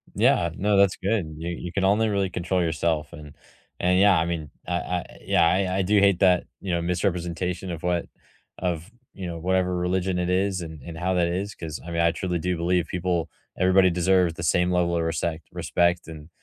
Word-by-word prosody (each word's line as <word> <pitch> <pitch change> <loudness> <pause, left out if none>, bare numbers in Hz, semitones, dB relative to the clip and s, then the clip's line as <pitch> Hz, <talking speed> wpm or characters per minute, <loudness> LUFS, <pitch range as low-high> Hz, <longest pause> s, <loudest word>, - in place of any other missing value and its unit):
Yeah, - - +3
no, 100 +1 +1
that's 100 -1 +4
good. 95 -7 -1
You 85 +2 -4
you 85 0 -5
can 100 0 -1
only 105 +3 +3
really 100 -2 0
control 90 +1 -1
yourself 80 -2 -1
and 75 -1 -11 0.4
and 90 +1 +3
yeah, 100 -3 +6
I 80 - +2
mean, 80 -4 -3 0.2
I 90 - -2
I 90 0 -2 0.2
yeah, 85 - +4
I 95 +1 +1
I - - +2
do 100 +2 +3
hate 100 -3 +4
that, 90 -2 +4 0.2
you 95 - -3
know, 85 - +1
misrepresentation 90 0 -2
of 85 -1 -6
what 90 -1 0 0.5
of, 90 +2 -3 0.2
you 95 -2 -6
know, 85 -1 -5
whatever 90 +1 0
religion 90 +1 0
it 90 0 -1
is 95 0 +1
and 80 -3 -8
and 80 +1 -8
how 90 +2 0
that 85 -1 +2
is 95 +4 -3
'cause, 80 -2 -6
I 85 - -7
mean, 85 0 0
I 85 0 +4
truly 90 0 -2
do 90 +1 -1
believe 85 0 +1
people 90 -2 -1 0.3
everybody 95 0 +4
deserves 90 0 +2
the 85 - -6
same 90 +2 +2
level 85 -1 +1
of 85 - 0
resect 80 0 -2
respect 85 0 0
and 80 0 -10
90 Hz, 210 wpm, -25 LUFS, 85-95 Hz, 0.5 s, yeah